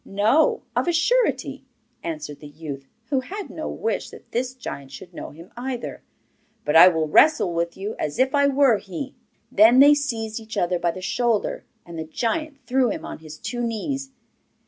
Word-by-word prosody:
'No, 275 - +2
of - - +1
a - - +4
surety,' 480 +10 +1 0.4
answered 155 -3 -5
the 150 - -10
youth, 145 -2 -8 0.2
who 270 - +3
had 390 +10 -7
no - - -5
wish 475 +3 -2
that - - -15
this 255 +2 -2
giant 140 - -7
should 180 +4 -11
know - - -7
him 165 +4 -14
either; 245 0 -5 0.6
'but 150 - 0
I 170 +3 +10
will 160 -3 +2
wrestle 195 - +4
with 170 0 -2
you 200 +3 -4
as 150 -1 -3
if 260 +1 +2
I 285 -1 +4
were 270 -5 +4
he.' 260 +8 -6 0.4
Then 225 +4 +6
they 285 +2 +9
seized 230 -7 -2
each 220 -1 -8
other 175 -2 +1
by 170 - +1
the 185 +2 -5
shoulder, 230 +3 0 0.2
and 170 -1 -8
the - - -2
giant 280 - -2
threw 255 -1 +2
him - - -4
on - - -7
his 155 -1 -10
two 240 +7 -4
knees. 265 +4 -3
225 Hz, 190 wpm, -23 LUFS, 170-270 Hz, 0.6 s, I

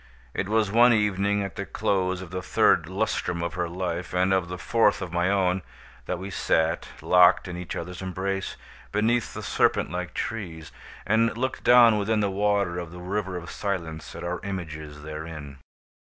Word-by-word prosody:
It 95 - -2
was 110 -2 +2
one 120 +2 +6
evening 100 -1 +1
at 100 -3 -6
the - - -2
close 95 -1 0
of 90 - -11
the 90 0 -3
third 80 - +3
lustrum 95 -3 -1
of 85 -2 -3
her 85 0 -2
life, 90 0 -3
and 95 +1 +3
of 95 -2 +1
the 90 +1 -5
fourth 110 +2 +2
of 90 -2 -6
my 90 +1 +2
own, 95 -2 +2 0.5
that 90 - -1
we 95 +2 -7
sat, 80 -2 +1 0.2
locked 90 +1 +5
in 90 - -5
each 90 -1 -5
other's 90 +2 -6
embrace, 95 +1 -3 0.4
beneath 115 +3 +1
the - - -5
serpent - - +1
like 90 0 -4
trees, 85 -8 -5 0.3
and 115 +2 +2
looked 130 +1 -2
down 120 -3 +7
within 105 +2 +1
the 100 -2 +1
water 100 -3 +1
of 85 -2 -6
the 90 +2 -10
River 95 0 -3
of 85 -1 -7
Silence 80 -6 -4
at 85 - -7
our 90 0 -2
images 80 -6 -6
therein. 75 -2 -7
95 Hz, 180 wpm, -26 LUFS, 85-100 Hz, 0.5 s, down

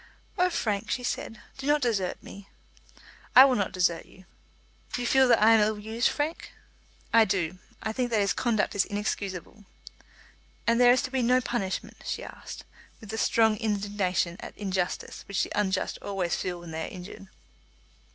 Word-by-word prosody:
"Oh, 365 -2 +3
Frank," 210 - -2
she 250 - -1
said, 230 -2 -4 0.2
"do 270 - -5
not 295 0 +3
desert 200 -7 -1
me." 200 0 -11 0.9
"I 260 - +11
will 270 - +3
not 200 -5 0
desert 175 -2 0
you." 185 - -18 0.7
"You 245 - -3
feel 265 +2 +5
that 245 - +5
I 225 - +7
am 225 - +6
ill 215 0 +2
used, 220 +4 0
Frank?" 305 +3 -3 0.6
"I 230 -1 +7
do. 185 -4 -1 0.2
I 220 - -2
think 245 +1 -1
that 225 -2 +1
his 200 -1 +2
conduct 225 -4 0
is 200 - +3
inexcusable." 205 -1 -4 1.0
"And 230 +1 +3
there 245 0 +8
is 255 - +3
to 255 - -4
be 265 -1 0
no 250 +2 +4
punishment?" 225 -6 -3
she - - -4
asked, - - -9 0.4
with 220 -3 -9
that 220 - -4
strong 220 -1 +3
indignation 200 -5 -1
at - - -9
injustice 190 -3 -3
which 200 -1 0
the - - -5
unjust 190 -2 -1
always 190 -4 -1
feel 180 -1 -3
when 170 -1 -9
they 160 0 -3
are - - -10
injured. 185 +2 -10
210 Hz, 180 wpm, -27 LUFS, 190-240 Hz, 1.0 s, I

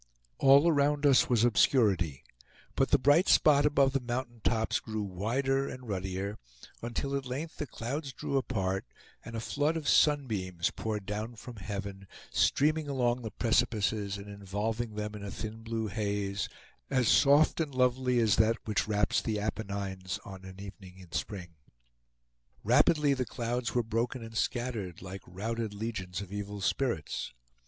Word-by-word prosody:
All 140 +3 +7
around 145 -2 +2
us 140 -3 +5
was 120 -3 +3
obscurity; 100 - +3 0.5
but - - +2
the - - +5
bright 145 +8 +4
spot 150 -2 +5
above 140 -2 +3
the 135 - +2
mountaintops 120 -2 -1
grew 110 -1 -4
wider 130 +9 0
and 125 -1 -9
ruddier, 95 +1 -3 0.4
until 120 +4 -2
at 135 -1 -3
length 145 +6 -5
the 150 - -3
clouds 135 +5 -4
drew 135 - -4
apart, 95 -7 0 0.4
and 115 +1 -8
a - - -2
flood 145 +7 0
of 155 -2 -5
sunbeams 105 - +2
poured 105 -3 -4
down 105 +4 -4
from 120 +1 -10
heaven, 95 0 -6 0.2
streaming 155 +1 +2
along 125 -2 +1
the 110 - -4
precipices, 110 -2 +1
and 100 0 -9
involving 105 +3 -3
them 105 0 -3
in 105 -1 -7
a 100 - -5
thin 110 +3 -6
blue 115 0 -3
haze, 100 -1 -2 0.4
as 130 -4 +2
soft 145 +4 +5
and 150 -5 -2
lovely 125 0 +2
as 110 -4 +3
that 110 +1 +4
which 105 -1 0
wraps 105 -1 +2
the 110 -2 -1
Apennines 100 -3 -3
on 95 -1 -9
an 95 0 -10
evening 95 -2 -10
in 90 -3 -14
spring. 90 -5 -4 1.1
Rapidly 145 +4 +4
the 130 -1 0
clouds 120 0 -3
were 120 - +3
broken 115 +3 -2
and 115 0 -9
scattered, 110 -8 -2
like 95 +1 -7
routed 110 +3 -4
legions 100 -5 -4
of 100 0 -8
evil 105 0 -5
spirits. 100 - -1
115 Hz, 155 wpm, -30 LUFS, 100-130 Hz, 1.1 s, All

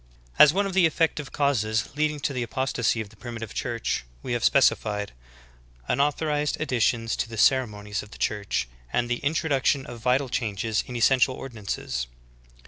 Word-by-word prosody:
I - - +9
1. - - +14
As 150 - +3
one 200 +1 +2
of 195 - -3
the 180 -3 +5
effective 155 -3 -1
causes 115 -6 +1
leading 150 0 0
to 140 - -1
the 125 - -2
apos 130 +3 -2
tasy 115 -1 +1
of 105 - -7
the 110 - -18
Primitive 115 -1 -7
Church 115 - -2 0.2
we 125 - -3
have 120 -1 -1
specified: 105 -6 +2 0.8
Unau 145 +1 +3
thorised 150 -2 -1
additions 120 -5 +1
to - - -2
the 115 - -7
ceremonies 105 -5 +2
of 105 - -12
the - - -12
Church, 100 - -1 0.2
and 120 - +1
the 120 - 0
introduction 140 -2 +1
of 120 - -9
vital 125 +4 +1
changes 110 -2 -1
in 125 - -7
essential 130 +2 +3
ordinances. 100 - -4
120 Hz, 180 wpm, -26 LUFS, 110-140 Hz, 0.8 s, 1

